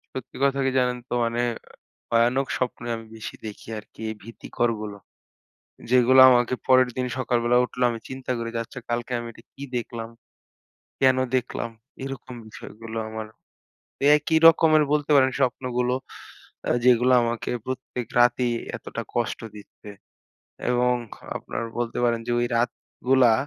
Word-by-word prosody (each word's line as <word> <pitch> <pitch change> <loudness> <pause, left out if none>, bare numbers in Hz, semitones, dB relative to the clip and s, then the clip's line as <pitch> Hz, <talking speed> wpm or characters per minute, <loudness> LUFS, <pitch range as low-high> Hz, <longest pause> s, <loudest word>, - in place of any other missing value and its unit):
সত্যি 130 - -7
কথা 140 0 +2
কি - - +2
জানেন 125 -1 +1
তো? - - -2
মানে 115 +1 -1 0.7
ভয়ানক 120 +3 +3
স্বপ্নে 125 -1 -3
আমি 115 0 -10
বেশি 110 - -7
দেখি 105 - -9
আরকি। 105 - -14
এই - - -4
ভীতিকরগুলো। 110 -2 -3 0.9
যেগুলো, 125 +1 +5
আমাকে 125 0 +3
পরের 130 -1 +5
দিন 125 - 0
সকালবেলা 120 -1 +2
উঠলে 125 0 -3
আমি 115 - -5
চিন্তা 130 -1 -5
করি, 115 0 -3
যে - - 0
আচ্ছা 130 +2 -10
কালকে 120 +1 -2
আমি 120 - -6
এটা - - -17
কি 140 - -9
দেখলাম? 115 -1 -5 0.9
কেন 130 -1 +5 0.2
দেখলাম? 125 -1 -2 0.3
এরকম 135 -2 -7
বিষয়গুলো 110 +1 -9
আমার। 110 0 -6 0.9
একই 160 +2 +1
রকমের 155 -2 +6
বলতে 150 0 0
পারেন 130 -1 +5
স্বপ্নগুলো। 125 -1 0 0.9
যেগুলো 125 +1 +5
আমাকে 115 -1 -2 0.2
প্রত্যেক 130 -2 -5
রাতেই 120 0 +3 0.2
এতটা - - -6
কষ্ট - - -1 0.2
দিচ্ছে। 105 0 -13 0.8
এবং 125 0 +3 0.4
আপনার - - -5 0.2
বলতে 120 -1 -2
পারেন, 115 -1 +1
যে 120 - -1
ওই 120 - +1
রাতগুলা, 125 +1 +2
125 Hz, 140 wpm, -25 LUFS, 115-130 Hz, 0.9 s, রকমের